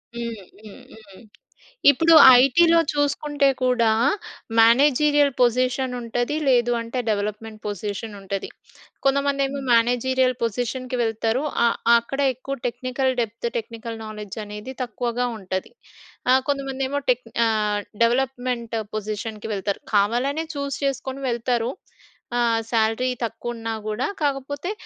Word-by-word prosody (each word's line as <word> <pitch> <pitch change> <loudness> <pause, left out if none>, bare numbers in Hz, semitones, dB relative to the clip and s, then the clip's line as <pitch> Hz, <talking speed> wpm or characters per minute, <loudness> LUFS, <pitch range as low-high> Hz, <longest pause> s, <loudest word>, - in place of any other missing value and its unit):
హ్మ్. 230 -5 -5 0.2
హ్మ్. 210 - -12 0.2
హ్మ్. 200 -1 -16 0.7
ఇప్పుడు 325 +4 +4 0.3
ఐటీ‌లో 335 +5 +5
చూసుకుంటే 290 0 +1
కూడా, 245 -3 +3 0.7
మేనేజీరియల్ 285 +4 +5
పొజిషన్ 255 +1 +1
ఉంటది, 245 +4 -2
లేదు 240 -2 +3
అంటే 230 +2 -4
డెవలప్‌మెంట్ 215 +1 -3
పొజిషన్ 205 +2 -5
ఉంటది. 195 0 -4 0.6
కొంతమందేమో 275 0 +1
మేనేజీరియల్ 255 +2 +2
పొజిషన్‌కి 245 +3 -2
వెళ్తారు. 225 +4 -1 0.2
ఆ - - +5 0.3
అక్కడ 270 +4 -7
ఎక్కువ 265 +2 -6
టెక్నికల్ 260 +2 -1
డెప్త్, 230 +1 -3
టెక్నికల్ 230 0 -6
నాలెడ్జ్ 210 -1 -8
అనేది 210 +5 -8
తక్కువగా 245 +1 -2
ఉంటది. 190 -1 -5 0.6
ఆ! - - +7 0.2
కొంతమందేమో 275 0 -2
టెక్ 250 -1 +2 0.2
ఆహ్, 210 -2 0 0.2
డెవలప్‌మెంట్ 245 -1 -1 0.2
పొజిషన్‌కి 215 +1 -5
వెళ్తారు. 200 0 -3
కావాలనే 250 +10 +1
చూస్ 280 -1 -3
చేసుకొని 270 0 -3
వెళ్తారు. 240 0 -1 0.7
ఆహ్, 230 -1 +2
సాలరీ 225 +3 +1
తక్కువున్నా 225 0 -5
కూడా. 215 +4 -1 0.2
కాకపోతే 285 +5 -2
240 Hz, 110 wpm, -23 LUFS, 225-270 Hz, 0.7 s, ఆ